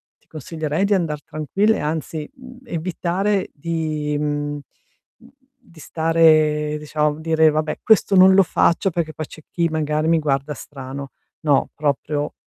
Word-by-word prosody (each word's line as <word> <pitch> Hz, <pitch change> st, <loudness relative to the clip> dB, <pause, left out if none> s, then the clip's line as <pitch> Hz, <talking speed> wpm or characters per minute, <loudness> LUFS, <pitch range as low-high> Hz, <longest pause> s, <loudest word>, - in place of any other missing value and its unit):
ti -, -, -38 dB
consiglierei 155 Hz, +3 st, -3 dB
di 205 Hz, -, +2 dB
andar 155 Hz, -6 st, -1 dB
tranquilla 195 Hz, +8 st, 0 dB
e -, -, -5 dB
anzi, 155 Hz, 0 st, -4 dB
mhmm, 255 Hz, -1 st, -14 dB
evitare 185 Hz, +2 st, -1 dB
di 155 Hz, -1 st, -3 dB
mhmm, 145 Hz, 0 st, -2 dB
uhm, -, -, -9 dB, 1.0 s
di 175 Hz, -10 st, -20 dB
stare 155 Hz, -2 st, +2 dB
diciamo, 150 Hz, 0 st, -1 dB
dire: 160 Hz, 0 st, +3 dB
"Vabbè, 155 Hz, 0 st, -2 dB
questo 215 Hz, -2 st, +3 dB
non 190 Hz, 0 st, +7 dB
lo 195 Hz, -, +7 dB
faccio 185 Hz, +2 st, +1 dB
perché 160 Hz, -2 st, -2 dB
poi 155 Hz, -, -4 dB
c'è 155 Hz, -, -13 dB
chi 170 Hz, -1 st, 0 dB
magari 155 Hz, 0 st, -1 dB
mi 165 Hz, 0 st, +3 dB
guarda 145 Hz, -1 st, -1 dB
strano". 135 Hz, 0 st, -8 dB, 0.3 s
No, 145 Hz, -3 st, +3 dB
proprio 145 Hz, 0 st, -2 dB
155 Hz, 150 wpm, -21 LUFS, 150-170 Hz, 1.0 s, non